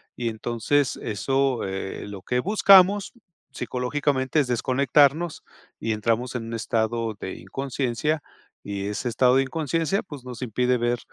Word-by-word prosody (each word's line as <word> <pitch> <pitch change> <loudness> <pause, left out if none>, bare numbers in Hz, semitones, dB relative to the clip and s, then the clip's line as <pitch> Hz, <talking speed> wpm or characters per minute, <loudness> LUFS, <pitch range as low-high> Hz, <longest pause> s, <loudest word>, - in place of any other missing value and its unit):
y 120 -1 -2
entonces 120 +5 0
eso, 135 +4 0
eh, 95 +1 -5
lo 100 -2 -8
que 125 +5 -1
buscamos 195 +2 +5 0.4
psicológicamente 130 +2 -1
es 140 - +1
desconectarnos 140 +6 +2 0.4
y 115 - -2
entramos 115 +3 -1
en 115 -2 -3
un 115 - -6
estado 115 0 -1
de 95 - -5
inconsciencia 135 - -2 0.4
y 100 0 -4
ese 110 +4 -2
estado 125 +2 +3
de 135 - +4
inconsciencia, 165 +6 -1
pues, 145 -8 -10
nos 125 -1 -8
impide 125 +1 +1
ver 120 0 0
125 Hz, 140 wpm, -24 LUFS, 115-145 Hz, 0.4 s, buscamos